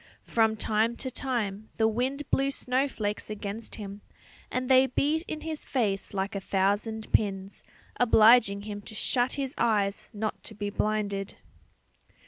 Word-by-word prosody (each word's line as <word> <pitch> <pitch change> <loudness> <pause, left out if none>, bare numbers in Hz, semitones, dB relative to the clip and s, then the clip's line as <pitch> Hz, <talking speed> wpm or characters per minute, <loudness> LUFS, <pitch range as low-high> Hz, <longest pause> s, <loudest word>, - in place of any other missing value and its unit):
From 220 -1 +2
time 220 +2 +1
to 260 +2 -4
time 220 -6 -2
the 220 - +4
wind 260 +6 -1
blew 275 0 +2
snowflakes 250 -6 -1
against 210 +1 -5
him, 200 -1 -8 0.5
and 255 0 -2
they 260 0 +6
beat 300 +5 +1
in 310 - -5
his 315 -1 -5
face 210 -8 -1
like 195 +1 -2
a 200 - -2
thousand 205 +4 0
pins, 195 -2 0 0.4
obliging 220 -3 +6
him 205 -1 -6
to 220 - -9
shut 245 +3 +1
his 275 -2 -3
eyes 205 -4 +1
not 215 -1 -3
to 215 - -6
be 205 0 -3
blinded. 205 -2 -1
220 Hz, 145 wpm, -28 LUFS, 205-255 Hz, 0.5 s, they